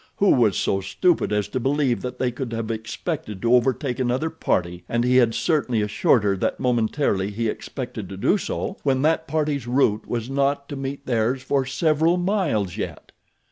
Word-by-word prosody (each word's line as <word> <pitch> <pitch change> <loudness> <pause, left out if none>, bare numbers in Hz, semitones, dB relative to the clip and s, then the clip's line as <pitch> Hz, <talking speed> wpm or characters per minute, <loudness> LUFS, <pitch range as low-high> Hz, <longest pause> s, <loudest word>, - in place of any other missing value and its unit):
Who 200 - +4
was 115 -6 +3
so 95 - 0
stupid 165 - +1
as 105 -1 0
to 130 - -2
believe 135 -1 +1
that 125 - -5
they 125 -1 0
could 120 -1 -5
have 115 0 -3
expected 110 - -4
to 120 +1 +3
overtake 125 +1 +1
another 130 +5 0
party, 90 - -1
and 120 0 +1
he 125 +1 +3
had 120 -3 +4
certainly 125 -9 +1
assured 105 +2 +2
her 100 -1 +2
that - - -1
momentarily 115 -4 +1
he 115 +3 -2
expected 110 -3 -5
to 95 - -7
do 200 - +2
so, 195 - -4
when 135 -1 +1
that 160 +1 +2
party's 145 -4 -1
route 120 -4 +1
was 120 -1 -3
not 140 +1 0
to 145 - -5
meet 135 0 -5
theirs 125 +2 0
for 135 0 0
several 160 +4 +2
miles 175 - 0
yet? - - -6
125 Hz, 185 wpm, -23 LUFS, 110-145 Hz, -, Who